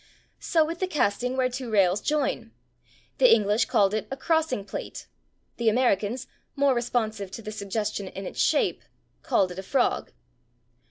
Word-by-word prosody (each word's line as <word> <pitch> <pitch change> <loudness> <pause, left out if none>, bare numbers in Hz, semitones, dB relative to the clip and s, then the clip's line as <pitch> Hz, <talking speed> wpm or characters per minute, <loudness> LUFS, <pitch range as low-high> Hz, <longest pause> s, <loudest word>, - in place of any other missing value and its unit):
So 320 -3 +2
with 335 +2 -5
the 375 - 0
casting 250 - 0
where 260 -1 +3
two 255 -1 -5
rails 195 -2 +3
join. 300 +4 -1 0.7
The - - +6
English 210 0 +4
called 205 -4 +2
it 215 - -2
a 270 - -5
/crossing 320 - 0
plate/. 200 - -7 0.5
The 235 -2 +3
Americans, 235 0 +1 0.3
more 280 -1 +3
responsive 220 -4 -1
to 225 - -9
the 215 - -6
suggestion 210 -1 -3
in 195 +1 -7
its - - -3
shape, 300 -2 +2 0.4
called 185 -2 +1
it 180 - -7
a - - -3
/frog 260 +8 0
230 Hz, 160 wpm, -26 LUFS, 200-270 Hz, 0.7 s, The